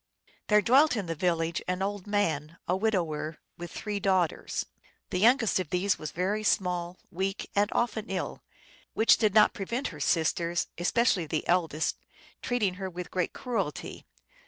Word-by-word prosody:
There 210 0 +4
dwelt 270 +6 +5
in 205 -4 -2
the 165 - -2
village 165 -1 0
an 180 +1 -1
old 205 0 -3
man, 165 -6 -1
a 180 - +2
widower, 170 -7 -1 0.2
with 175 0 -6
three 205 +2 -4
daughters. 185 -4 0 0.5
The 180 - 0
youngest 230 -1 +4
of 180 -5 -3
these 185 +3 +1
was 155 - -4
very 195 +5 -1
small, 180 -3 0
weak, 190 +2 -3
and 205 +1 +3
often 225 -2 -1
ill, 190 -1 -3 0.5
which 225 - +5
did 215 -3 +2
not 215 - +6
prevent 235 +8 -3
her - - -10
sisters, 170 +1 +1
especially 185 -2 +2
the 155 +1 -2
eldest, 165 -3 +1 0.4
treating 220 -7 0
her 190 - -2
with 180 -1 -7
great 180 -2 -1
cruelty. 220 - -4
185 Hz, 160 wpm, -28 LUFS, 170-210 Hz, 0.5 s, not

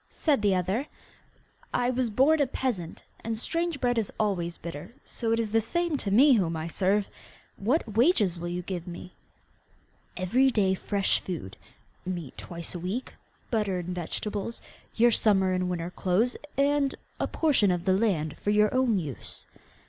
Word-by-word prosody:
said 290 -8 +1
the 200 -2 +3
other. 190 +9 -1 0.9
'I 245 0 +2
was 250 -1 0
born 285 +8 +4
a 280 - +3
peasant, 230 -11 -3 0.2
and 225 0 -2
strange 335 +5 -2
bread 245 -2 +2
is 215 - -2
always 175 -5 0
bitter, 170 +7 -8
so 230 -2 -3
it 230 - +2
is 220 -2 -1
the 225 +1 +3
same 340 +8 -1
to 215 - -3
me 260 +8 +6
whom 170 -8 +1
I 160 +1 -4
serve! 195 +4 +1 0.5
What 225 0 0
wages 225 - +3
will 175 - -4
you 175 +1 -3
give 180 -2 -5
me?' 175 +1 -8 1.0
'Every 245 +9 +3
day 200 -6 +2
fresh 195 +1 0
food, 160 - -6 0.5
meat 175 -6 -5
twice 170 -1 -6
a 175 - -5
week, 190 +9 -4 0.4
butter 210 -5 +1
and 180 0 -4
vegetables, 205 +5 -4 0.4
your 235 +1 +5
summer 195 -4 +3
and 185 0 0
winter 175 -1 -3
clothes, 200 +7 +1 0.2
and 280 0 +2 0.2
a - - 0
portion 280 -11 +2
of 180 +1 -1
land 185 -6 +1
for - - -2
your 210 0 +4
own 255 -4 +3
use. 150 -8 -6
205 Hz, 165 wpm, -28 LUFS, 180-245 Hz, 1.0 s, me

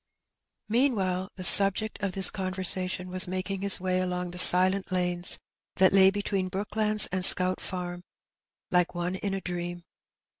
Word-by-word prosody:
'* - - -60
Meanwhile 195 -8 -2
the 185 - -9
subject 200 +4 +4
of 195 -2 -4
this 190 0 +6
conversation 185 -1 -2
was 185 0 +2
making 185 +1 -6
his 200 -1 +3
way 185 0 -3
along 180 -1 -5
the 180 - -8
silent 185 +2 +5
lanes 180 -1 -1 0.4
that 190 0 +2
lay 190 -1 +5
between 200 -1 -4
Brooklands 210 +2 0
and 185 0 -2
Scout 185 0 +2
Farm 180 -1 -8 0.7
like 180 0 -1
one 175 +1 -4
in 195 +1 -5
a 195 - -6
dream. 175 -1 -7
185 Hz, 155 wpm, -25 LUFS, 180-195 Hz, 0.7 s, this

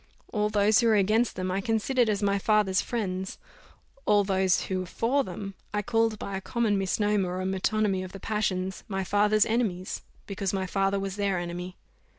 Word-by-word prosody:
All 210 -1 +1
those 210 0 +4
who 235 - +3
were 220 - +5
against 215 +4 +2
them, 185 0 -2
I 190 +2 0
considered 225 +3 +1
as 205 -1 0
my 200 0 +2
father's 205 -2 +2
friends; 190 -5 -3 0.7
all 205 -1 +5
those 190 -1 +2
who 190 -1 -2
were 185 - -3
for 255 +9 +1
them, 195 -1 -6 0.2
I 210 - 0
called 225 -1 +1
by 200 -1 -5
a 190 - -3
common 230 0 0
misnomer, 195 -1 0
or 185 - -2
metonymy 195 +1 0
of 185 - -8
the 195 - -9
passions, 190 -3 -2
my 195 -2 -2
father's 205 +3 +3
enemies, 210 -6 -1 0.2
because 195 -1 -3
my 190 -1 -1
father 195 +1 0
was 195 0 -4
their 200 -2 +1
enemy. 175 +1 -5
200 Hz, 185 wpm, -27 LUFS, 190-215 Hz, 0.7 s, were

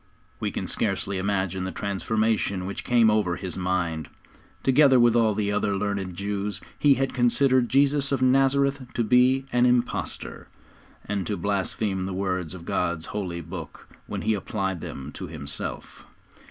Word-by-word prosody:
We - - -1
can - - -4
scarcely 100 -1 -1
imagine 95 -1 -1
the 95 - -3
transformation 100 -1 -1
which 100 - -5
came 115 -3 +4
over 105 -5 +1
his 90 +1 -6
mind. 90 -4 -2 0.5
Together 135 -1 +5
with 120 -1 +5
all 110 -3 +3
the 105 -1 0
other 100 -1 0
learned 100 -2 -2
Jews 100 +1 -3 0.2
he 145 -2 +5
had 135 +1 -1
considered 125 0 +3
Jesus 140 +1 +3
of 140 - +1
Nazareth 135 +2 +3
to 120 - +1
be 125 +4 +4
an 125 0 +4
impostor, 125 0 -1 0.6
and 100 -2 -2
to 105 - -2
blaspheme 95 0 -1
the 95 - -4
words 90 -2 -2
of 85 -2 -10
God's 85 -2 -1
Holy 90 -5 -3
Book 85 +3 -9 0.2
when - - -4
He 110 - +2
applied 95 -3 -3
them 70 +2 -7
to - - -7
Himself. 75 -3 -5
100 Hz, 155 wpm, -25 LUFS, 95-125 Hz, 0.6 s, Together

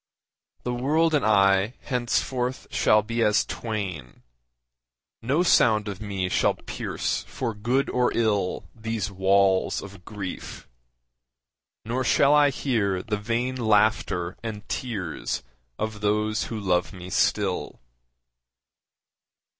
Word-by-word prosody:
The 125 - -2
world 155 +6 +2
and 150 - +2
I 100 +1 +3
henceforth 125 0 -1
shall 105 0 +3
be 115 +2 -2
as 105 -2 +3
twain, 90 - -5 1.0
No 140 +9 +1
sound 110 - +4
of 100 -1 -6
me 100 -3 -2
shall - - +2
pierce - - -3
for 120 -3 -3
good 120 +6 0
or 125 -1 +1
ill 105 -5 0
These 110 -3 -3
walls 95 0 +2
of 100 -2 -11
grief. 100 -1 -7 1.2
Nor 125 +3 -1
shall 140 +3 +4
I 145 -1 +6
hear 105 -9 -1
the 105 -1 -2
vain 120 +4 -1
Laughter 105 -6 +1
and 110 -2 -6
tears 100 -10 -3 0.3
of 110 -1 -4
those 105 +1 0
who 115 - -5
love 90 -2 0
me 90 -1 -9
still. 95 -2 0
105 Hz, 115 wpm, -25 LUFS, 100-120 Hz, 1.2 s, I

